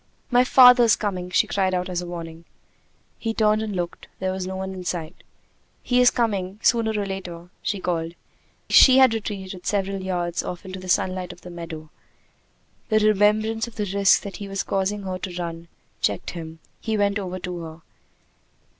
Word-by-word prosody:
"My 245 Hz, 0 st, +5 dB
father's 250 Hz, -3 st, +7 dB
coming!" 185 Hz, -4 st, -3 dB
she 180 Hz, -, +3 dB
cried 190 Hz, -2 st, 0 dB
out 180 Hz, 0 st, -1 dB
as 180 Hz, -1 st, -2 dB
a 175 Hz, -, -7 dB
warning. 165 Hz, -1 st, -8 dB, 0.7 s
He 225 Hz, -1 st, -3 dB
turned 215 Hz, 0 st, +3 dB
and 215 Hz, -2 st, -4 dB
looked: 175 Hz, -1 st, -4 dB
there 185 Hz, 0 st, -2 dB
was 185 Hz, -1 st, -4 dB
no 190 Hz, -, -4 dB
one 190 Hz, 0 st, -4 dB
in 185 Hz, -1 st, -7 dB
sight. 170 Hz, -1 st, -4 dB, 0.7 s
"He 250 Hz, 0 st, +3 dB
is 250 Hz, -, +7 dB
coming 200 Hz, -4 st, -1 dB
sooner 230 Hz, -2 st, +3 dB
or 200 Hz, -, -1 dB
later!" 180 Hz, -3 st, -7 dB
she 205 Hz, -, -2 dB
called. 170 Hz, -2 st, -2 dB, 0.5 s
She 260 Hz, -1 st, +7 dB
had 260 Hz, -3 st, +6 dB
retreated 195 Hz, -4 st, -5 dB
several 195 Hz, -1 st, -1 dB
yards 175 Hz, -2 st, -2 dB
off 180 Hz, +2 st, -7 dB
into 190 Hz, 0 st, -7 dB
the 185 Hz, 0 st, -9 dB
sunlight 185 Hz, 0 st, 0 dB
of 175 Hz, -, -14 dB
the 180 Hz, -, -10 dB
meadow. 165 Hz, -3 st, -8 dB, 1.0 s
The 215 Hz, -, +3 dB
remembrance 215 Hz, +2 st, +2 dB
of 235 Hz, -, -12 dB
the 210 Hz, -1 st, -2 dB
risk 200 Hz, -1 st, +4 dB
that 200 Hz, -, -7 dB
he 205 Hz, -, -7 dB
was 195 Hz, 0 st, -3 dB
causing 195 Hz, +1 st, -1 dB
her 185 Hz, -1 st, -4 dB
to 185 Hz, -2 st, -6 dB
run 170 Hz, -1 st, -5 dB, 0.3 s
checked -, -, -1 dB
him. 165 Hz, -2 st, -8 dB, 0.2 s
He 220 Hz, -1 st, -2 dB
went 205 Hz, 0 st, +1 dB
over 185 Hz, -2 st, -5 dB
to 180 Hz, -1 st, -5 dB
her. 160 Hz, 0 st, -9 dB
190 Hz, 185 wpm, -23 LUFS, 180-210 Hz, 1.0 s, father's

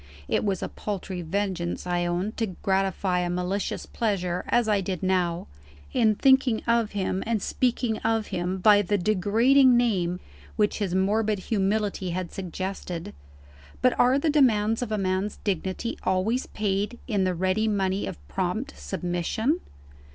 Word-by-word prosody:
(It -, -, +1 dB
was 195 Hz, -3 st, -1 dB
a -, -, -1 dB
paltry 190 Hz, -3 st, -5 dB
vengeance, 180 Hz, 0 st, -2 dB
I 175 Hz, -1 st, 0 dB
own, 180 Hz, +4 st, -1 dB
to 225 Hz, -, 0 dB, 0.2 s
gratify 190 Hz, -1 st, +1 dB
a 175 Hz, 0 st, -1 dB
malicious 180 Hz, +3 st, -2 dB
pleasure 185 Hz, -6 st, -1 dB
as 240 Hz, -2 st, +2 dB
I 205 Hz, -2 st, +2 dB
did 185 Hz, -1 st, -4 dB
now 180 Hz, -2 st, +1 dB, 0.5 s
in 220 Hz, -4 st, +3 dB
thinking 265 Hz, -2 st, +3 dB
of 235 Hz, -2 st, +1 dB
him 190 Hz, -1 st, -1 dB
and 230 Hz, -2 st, +1 dB
speaking 240 Hz, +1 st, 0 dB
of 225 Hz, -1 st, 0 dB
him 180 Hz, +1 st, -2 dB
by 205 Hz, +2 st, +6 dB
the 205 Hz, +1 st, 0 dB
degrading 225 Hz, +7 st, +4 dB
name 180 Hz, -7 st, +1 dB, 0.4 s
which 210 Hz, 0 st, +1 dB
his 190 Hz, -4 st, -1 dB
morbid 210 Hz, +3 st, +1 dB, 0.2 s
humility 200 Hz, -2 st, 0 dB
had 180 Hz, 0 st, -4 dB
suggested. 185 Hz, -2 st, -5 dB, 0.7 s
But -, -, +5 dB
are 255 Hz, +2 st, +5 dB
the 300 Hz, +2 st, +1 dB
demands 225 Hz, -6 st, +3 dB
of 240 Hz, -3 st, -3 dB
a 215 Hz, -, 0 dB
man's 190 Hz, +1 st, -1 dB
dignity 190 Hz, +3 st, -2 dB
always 190 Hz, +7 st, 0 dB
paid 205 Hz, +2 st, -2 dB
in 205 Hz, -6 st, +1 dB
the 185 Hz, -1 st, 0 dB
ready 185 Hz, +5 st, +1 dB
money 195 Hz, -2 st, 0 dB
of 70 Hz, 0 st, -9 dB
prompt 190 Hz, -, -2 dB
submission?) 190 Hz, -, -1 dB
200 Hz, 150 wpm, -26 LUFS, 185-220 Hz, 0.7 s, by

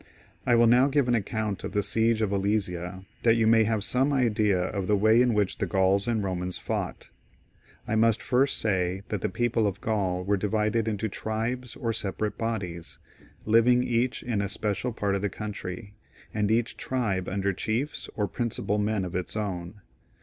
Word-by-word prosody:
I 120 Hz, -, +5 dB
will 120 Hz, 0 st, +5 dB
now 125 Hz, +3 st, +5 dB
give 140 Hz, -2 st, +2 dB
an 120 Hz, -, +2 dB
account 110 Hz, -2 st, -2 dB
of -, -, -5 dB
the 105 Hz, -, +1 dB
siege 115 Hz, +1 st, +2 dB
of 105 Hz, -, 0 dB
Alesia, 95 Hz, -2 st, -1 dB, 0.2 s
that 115 Hz, -1 st, +4 dB
you 115 Hz, -1 st, +2 dB
may 110 Hz, 0 st, +5 dB
have 110 Hz, -2 st, 0 dB
some 130 Hz, +6 st, +2 dB
idea 110 Hz, -7 st, +2 dB
of 95 Hz, +1 st, -2 dB
the 105 Hz, -, +3 dB
way 110 Hz, +4 st, +5 dB
in 125 Hz, -3 st, +2 dB
which 105 Hz, -2 st, 0 dB
the -, -, 0 dB
Gauls 95 Hz, +1 st, +2 dB
and 115 Hz, -3 st, 0 dB
Romans 90 Hz, -1 st, -2 dB
fought. -, -, -4 dB, 0.8 s
I -, -, -2 dB
must 115 Hz, 0 st, +3 dB
first 135 Hz, +2 st, +1 dB
say 95 Hz, -2 st, 0 dB
that 105 Hz, -, -2 dB
the -, -, 0 dB
people 115 Hz, -1 st, +1 dB
of 100 Hz, 0 st, -3 dB
Gaul 100 Hz, -6 st, -1 dB
were 100 Hz, +2 st, +1 dB
divided 105 Hz, +2 st, 0 dB
into 110 Hz, 0 st, -1 dB
tribes 115 Hz, +4 st, -3 dB
or 115 Hz, -1 st, -2 dB
separate 105 Hz, 0 st, -2 dB
bodies, 95 Hz, -8 st, -4 dB, 0.5 s
living 115 Hz, +3 st, +4 dB
each 120 Hz, +1 st, 0 dB
iQ 105 Hz, -4 st, 0 dB
a 100 Hz, -, -3 dB
special 105 Hz, +4 st, -2 dB
part 100 Hz, -3 st, -1 dB
of 100 Hz, -, -1 dB
the 105 Hz, -, 0 dB
country, 100 Hz, 0 st, -6 dB, 0.4 s
and 105 Hz, -2 st, 0 dB
each 115 Hz, +1 st, +1 dB
tribe 105 Hz, -8 st, -1 dB
under 100 Hz, 0 st, 0 dB
chiefs 115 Hz, +10 st, -2 dB
or 105 Hz, -2 st, 0 dB
principal 110 Hz, -3 st, -2 dB
men 105 Hz, -2 st, 0 dB
of 90 Hz, -, -6 dB
its 90 Hz, +2 st, -3 dB
own. 95 Hz, -1 st, -4 dB
105 Hz, 185 wpm, -27 LUFS, 100-115 Hz, 0.8 s, I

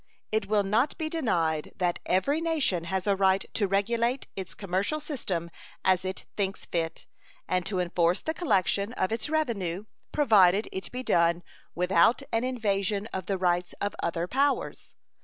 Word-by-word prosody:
It 215 Hz, -2 st, 0 dB
will 210 Hz, 0 st, +2 dB
not 220 Hz, +9 st, +1 dB
be 315 Hz, -2 st, -2 dB
denied 170 Hz, -, 0 dB
that 175 Hz, -2 st, 0 dB
every 280 Hz, -, +2 dB
nation 290 Hz, -, +1 dB
has 190 Hz, +1 st, -2 dB
a 200 Hz, -1 st, +3 dB
right 190 Hz, 0 st, +3 dB
to 205 Hz, -, +1 dB
regulate 235 Hz, +6 st, +1 dB
its 190 Hz, -2 st, -6 dB
commercial 195 Hz, +10 st, -1 dB
system 195 Hz, -, -3 dB, 0.3 s
as 185 Hz, -1 st, +3 dB
it 185 Hz, 0 st, -4 dB
thinks 195 Hz, -1 st, -2 dB
fit 165 Hz, -1 st, -3 dB, 0.4 s
and 180 Hz, 0 st, 0 dB
to 195 Hz, -2 st, -1 dB
enforce 175 Hz, 0 st, +2 dB
the 315 Hz, -, -3 dB
collection 205 Hz, -, +1 dB
of 185 Hz, -, -1 dB
its 225 Hz, +6 st, -2 dB
revenue, 210 Hz, -, -1 dB, 0.3 s
provided 210 Hz, -8 st, +5 dB
it 190 Hz, -, -5 dB
be 255 Hz, +1 st, -4 dB
done 170 Hz, -4 st, +2 dB, 0.3 s
without 180 Hz, +8 st, +3 dB
an 225 Hz, +1 st, +2 dB
invasion 205 Hz, -5 st, 0 dB
of 185 Hz, -1 st, -4 dB
the 195 Hz, -, 0 dB
rights 180 Hz, -1 st, 0 dB
of 205 Hz, -1 st, -3 dB
other 170 Hz, 0 st, -1 dB
powers. 275 Hz, +6 st, -1 dB
195 Hz, 160 wpm, -28 LUFS, 180-235 Hz, 0.4 s, provided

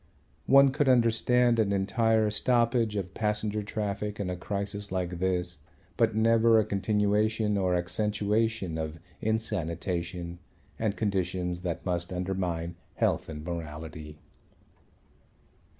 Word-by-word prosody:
One 140 Hz, 0 st, +7 dB
could 145 Hz, 0 st, +1 dB
understand 120 Hz, 0 st, +3 dB
an 105 Hz, -3 st, +2 dB
entire 110 Hz, +2 st, +2 dB
stoppage 115 Hz, 0 st, +2 dB
of 95 Hz, -2 st, -3 dB
passenger 105 Hz, 0 st, -1 dB
traffic 105 Hz, 0 st, -3 dB
in 95 Hz, -3 st, -2 dB
a -, -, -2 dB
crisis 100 Hz, +2 st, -4 dB
like 90 Hz, -2 st, -2 dB
this, 90 Hz, -3 st, -1 dB, 0.4 s
but -, -, +2 dB
never 115 Hz, +1 st, +4 dB
a 110 Hz, -, +3 dB
continuation 105 Hz, +1 st, +1 dB
or 95 Hz, -2 st, +1 dB
accentuation 105 Hz, 0 st, 0 dB
of 80 Hz, +1 st, -4 dB, 0.2 s
insanitation 90 Hz, -4 st, -2 dB, 0.4 s
and 110 Hz, -2 st, -1 dB
conditions 90 Hz, -4 st, -1 dB
that 90 Hz, -2 st, -4 dB
must 90 Hz, -1 st, -2 dB
undermine 90 Hz, -2 st, -2 dB, 0.2 s
health -, -, 0 dB
and 75 Hz, -1 st, -6 dB
morality. 80 Hz, -2 st, -6 dB
100 Hz, 115 wpm, -28 LUFS, 90-110 Hz, 0.4 s, One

